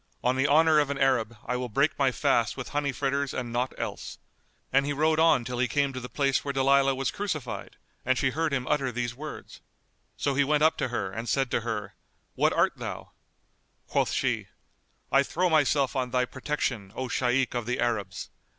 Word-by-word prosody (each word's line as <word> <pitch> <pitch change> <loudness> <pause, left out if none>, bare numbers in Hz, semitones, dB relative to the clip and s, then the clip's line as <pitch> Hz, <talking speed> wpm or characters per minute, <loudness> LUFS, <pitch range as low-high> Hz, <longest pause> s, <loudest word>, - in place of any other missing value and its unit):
On 125 +1 +2
the 135 +2 +2
honour 155 +1 +5
of 145 -2 +1
an 140 - -2
Arab 120 -5 +1
I 125 - -1
will 125 0 -3
break 140 +8 +1
my 135 -2 +3
fast 120 -1 +1
with 135 - -5
honey 145 -1 -1
fritters 140 +1 -1
and 120 -2 -4
naught 125 +2 0
else;" - - -5 0.6
and 135 +1 +5
he 145 +1 -1
rode 155 +2 +2
on 160 -7 +4
till 125 0 -4
he 125 - +2
came 140 +2 0
to 130 - -4
the 125 0 -8
place 140 -2 +1
where 140 - -2
Dalilah 135 0 +3
was 135 0 -1
crucified 155 - -4 0.3
and 130 0 +1
she 135 0 +1
heard 160 +3 -1
him 130 -2 -1
utter 140 -4 +1
these 120 0 -3
words. 150 +5 -9 0.6
So 140 - 0
he 140 +1 +3
went 150 +1 +2
up 160 - +5
to - - 0
her 100 -6 -3
and 115 +4 -5
said 135 -3 +1
to - - +1
her, 105 -3 -4 0.4
"What - - +2
art - - +2
thou?" - - -6 0.7
Quoth - - 0
she, - - -1 0.6
"I 135 - +5
throw 175 +5 0
myself 145 -3 +2
on 130 -2 -1
thy 125 0 +1
protection, 125 -7 -3
O 130 - -3
Shaykh 125 +1 +1
of 120 -2 -3
the 125 - -1
Arabs!" 105 -6 -2
135 Hz, 205 wpm, -27 LUFS, 125-140 Hz, 0.7 s, honour